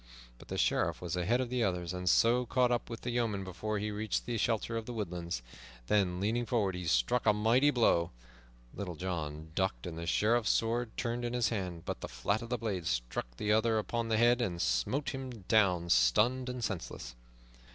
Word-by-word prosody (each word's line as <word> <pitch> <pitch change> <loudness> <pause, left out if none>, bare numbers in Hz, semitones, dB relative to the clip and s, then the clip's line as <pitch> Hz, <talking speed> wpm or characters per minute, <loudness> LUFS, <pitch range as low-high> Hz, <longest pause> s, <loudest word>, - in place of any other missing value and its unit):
But - - -14
the - - -4
Sheriff - - +1
was 90 -1 -3
ahead 105 +8 +1
of 125 -1 -4
the 125 -2 +1
others, 90 -3 -1
and 90 0 -1
so 120 +4 +4
caught 125 0 +2
up 120 -1 -1
with 115 -1 -6
the 125 - -3
yeoman 115 -5 0
before 95 +4 -3
he 105 +1 -2
reached 105 +1 -2
the 120 - -2
shelter 115 0 0
of 115 -1 -3
the 125 - -4
woodlands, 85 - -4 0.4
then 90 +1 +1
leaning 115 +4 0
forward 105 -5 +1
he 90 -1 -5
struck 70 - +2
a 105 - +6
mighty 115 +7 +4
blow. 115 - +3 0.6
Little 90 -4 -5
John 80 -3 -4
ducked 95 +3 -1
and 85 -2 -5
the 85 - -5
Sheriff's 110 +5 +2
sword 115 +1 0
turned 120 +1 -2
in 120 0 -2
his 120 -1 +2
hand, 90 -6 -4
but - - -4
the - - -4
flat 80 - -1
of 115 - -7
the 125 - 0
blade 100 -8 -3
struck - - -2
the 105 - 0
other 110 +1 +3
upon 115 +2 -1
the 110 -1 +1
head 120 +2 +4
and 90 -7 -2
smote 65 - 0
him 135 -1 -5 0.2
down, 90 -6 +3
stunned 120 - +3
and 125 -1 -4
senseless. 80 - -4
105 Hz, 205 wpm, -32 LUFS, 90-120 Hz, 0.6 s, a